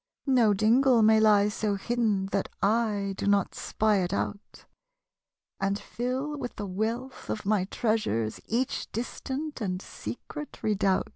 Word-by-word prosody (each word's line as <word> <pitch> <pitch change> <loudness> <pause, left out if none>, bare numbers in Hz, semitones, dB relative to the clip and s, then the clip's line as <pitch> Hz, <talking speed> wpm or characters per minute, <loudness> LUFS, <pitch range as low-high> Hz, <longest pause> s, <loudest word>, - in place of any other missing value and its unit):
No 240 -7 +4
dingle 235 +3 +4
may 220 0 +6
lie 210 -2 +5
so 210 0 -1
hidden 210 -2 0
That 195 - 0 0.7
/ - - -31
do - - -2
not 200 -2 +2
spy 215 -1 +1
it 180 -2 0
out, 200 +1 -4 0.9
And 195 +1 0
fill 255 +7 -3
with 245 - -5
the 205 - -5
wealih 225 +7 -3
of 210 - -3
my 205 -2 +2
treasures 190 - -1
Each 245 +3 -1
distant 265 +5 -4
and 185 -3 -1
secret 295 +8 -8
redoubt. 200 -3 +1
215 Hz, 140 wpm, -28 LUFS, 200-245 Hz, 0.9 s, may